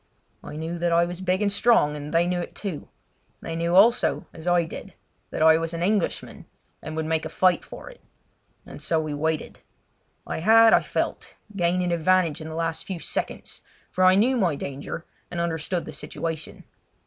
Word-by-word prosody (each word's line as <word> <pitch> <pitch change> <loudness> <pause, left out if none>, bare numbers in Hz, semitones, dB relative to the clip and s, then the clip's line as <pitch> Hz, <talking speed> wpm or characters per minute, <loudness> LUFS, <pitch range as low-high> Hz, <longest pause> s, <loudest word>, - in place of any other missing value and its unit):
I - - -8
knew 165 +2 -4
that 175 0 0
I 170 +1 +4
was 175 +1 -6
big 185 +2 0
and 200 -1 +1
strong, 200 -9 +3
and 150 0 -7
they 170 +1 +3
knew 180 0 -1
it, 175 - -6
too. 190 -8 -5 0.5
They 165 - -5
knew 170 +1 0
also, 230 +6 +4
as 160 +1 -10
I 175 -1 +4
did, 160 - -9 0.3
that - - -1
I 160 0 +6
was 165 0 -3
an 170 - -2
Englishman 200 -1 -1 0.3
and 155 +1 -6
would 160 0 -2
make 160 0 0
a 160 - -4
fight 185 +2 +2
for - - -11
it; - - -13 0.6
and - - -11
so 165 - +1
we 155 -1 -3
waited. 155 +1 -2 0.7
I - - -4
had, 225 +5 +6
I - - +6
felt, - - -3 0.2
gained 180 0 +1
an 175 - -1
advantage 170 -2 +2
in 155 - -7
the 160 - -6
last 165 0 -2
few 190 - -4
seconds, - - -5 0.3
for 185 - +1
I 185 0 +7
knew 245 +6 +3
my 180 -9 +1
danger 140 +4 -6 0.2
and 175 - -5
understood 170 +1 -2
the 155 - -8
situation. 160 +2 -6
170 Hz, 195 wpm, -25 LUFS, 160-185 Hz, 0.7 s, I